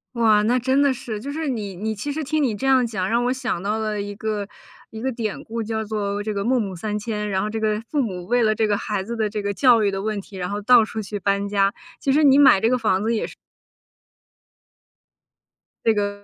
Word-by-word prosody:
哇， 220 -3 +4
那 245 +4 +2
真 260 +3 +1
的 280 -2 +3
是。 225 -4 -6
就 275 +6 -6
是 315 +1 -3
你 210 -7 -3
你 220 +4 -3
其 285 +8 -4
实 310 +2 -3
听 310 +2 0
你 235 -6 0
这 265 +6 -3
样 260 -2 +4
讲， 195 -5 -2
让 235 +1 +2
我 250 - +2
想 250 -9 -3
到 210 +2 -1
了 215 -1 -2
一 205 0 -4
个 210 -1 -3 0.4
一 220 - -8
个 265 +2 -1
典 225 -4 -4
故， 230 0 -4
叫 220 0 -2
做 205 -1 -2
这 215 +1 -3
个 200 - -2
《孟 250 0 +2
母 195 -3 -4
三 210 +4 -3
迁》。 210 -1 -3
然 190 -1 0
后 210 - -2
这 220 +1 -3
个 215 -1 0
父 295 - -1
母 185 -7 -4
为 245 +2 +2
了 215 -1 +3
这 215 0 +1
个 205 -1 +1
孩 205 -2 -3
子 235 +4 -5
的 220 -2 0
这 210 0 -3
个 200 0 -1
教 245 -2 +5
育 205 - +3
的 195 0 -3
问 215 -1 -2
题， 195 0 -12
然 180 -1 -3
后 205 +1 -3
到 235 +1 +6
处 220 0 -5
去 205 0 -5
搬 200 +1 0
家， 200 -1 +2 0.3
其 270 - +1
实 305 +2 +4
你 275 -1 +6
买 275 -9 +7
这 225 - +3
个 255 - +2
房 210 -5 +1
子 225 +2 +1
也 220 - -1
是。 - - -10 2.5
这 225 - +5
个 205 -1 -2
220 Hz, 275 characters per minute, -22 LUFS, 205-240 Hz, 2.5 s, 买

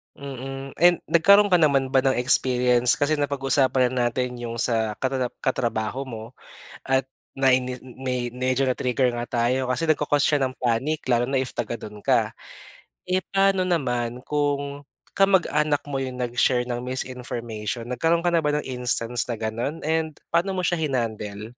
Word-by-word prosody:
Mm 135 0 -7
and 175 0 +4
nagkaroon 200 +4 +6
ka 180 - +5
naman 135 -4 +2
ba 135 - +4
ng 130 0 +2
experience, 125 -1 +3
kasi 145 +1 0
napag-usapan 135 -2 +1
na 125 -2 +1
natin 125 +1 -2
yung 115 -1 -5
sa 115 -2 0
katata 130 -1 -1 0.2
katrabaho 125 0 -1
mo, 110 -3 -7 0.6
at 130 0 +1 0.2
naini 130 -1 +1
me 125 -1 -4
medyo 130 +2 0
na-trigger 125 0 +1
nga 120 - -3
tayo 125 +2 0
kasi 165 +5 -1
nagko-cause 145 -2 +2
siya 145 - +3
ng 130 - -4
panic 130 +6 0
lalo 120 0 +3
na 135 +1 0
if 130 - -3
taga - - -2
dun 105 0 -9
ka. - - +3 0.8
Eh, 185 +1 0
paano 195 -1 +3
naman 125 -8 -1
kung 145 -1 -1 0.3
kamag-anak 160 -7 +2
mo 140 -2 -3
yung 130 -1 -5
nag-share 125 0 +1
ng 120 -1 -3
misinformation? 120 -3 -4
Nagkaroon 165 +8 0
ka 175 - +2
na 165 - +3
ba 150 - 0
ng 150 - -4
instance 125 -2 0
na 115 - -2
gano'n? 115 +8 -3
And 160 -1 -1 0.2
paano 175 +4 +2
mo 180 - -1
siya 175 -2 0
hinandle? 110 -5 -3
130 Hz, 160 wpm, -24 LUFS, 120-145 Hz, 0.8 s, nagkaroon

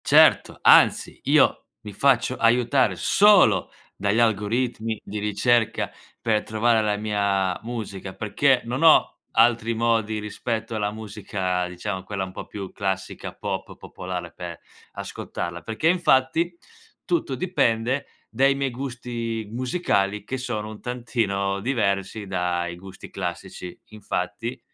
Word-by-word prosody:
Certo, - - +5
anzi, - - +5
io - - +3 0.2
mi 105 -1 -9
faccio 130 +2 +2
aiutare 120 +3 +3
solo 195 - +5 0.3
dagli 100 +3 +1
algoritmi 115 0 0
di 105 +1 -5
ricerca 105 +3 +1 0.3
per 110 -2 +1
trovare 110 +1 +2
la 105 -1 0
mia 100 -3 0
musica, 105 -5 -6
perché 130 +4 +2
non 125 +5 -3
ho 160 - +5
altri 115 0 +3
modi 110 -2 +1
rispetto 110 +2 -4
alla 105 -1 -1
musica, 100 -4 -3
diciamo 90 +1 -5
quella 95 0 -3
un 95 - -9
po' - - -7
più 100 -2 -7
classica, 95 -2 -3
pop, - - -5
popolare 90 -2 -7
per 85 -2 -7 0.3
ascoltarla. 85 0 -5
Perché 115 +8 -2
infatti 165 0 +2 0.5
tutto 335 - 0
dipende 130 -6 0 0.2
dai 135 +1 +2
miei 140 -1 -1
gusti 120 -3 -4
musicali 115 - 0
che 130 - -3
sono 110 -4 -4
un 110 -1 -10
tantino 110 -5 -1
diversi 105 -4 -1
dai 90 -2 -1
gusti 95 +2 -11
classici. 90 +1 -6
Infatti 105 +3 -4
110 Hz, 125 wpm, -24 LUFS, 100-120 Hz, 0.5 s, Certo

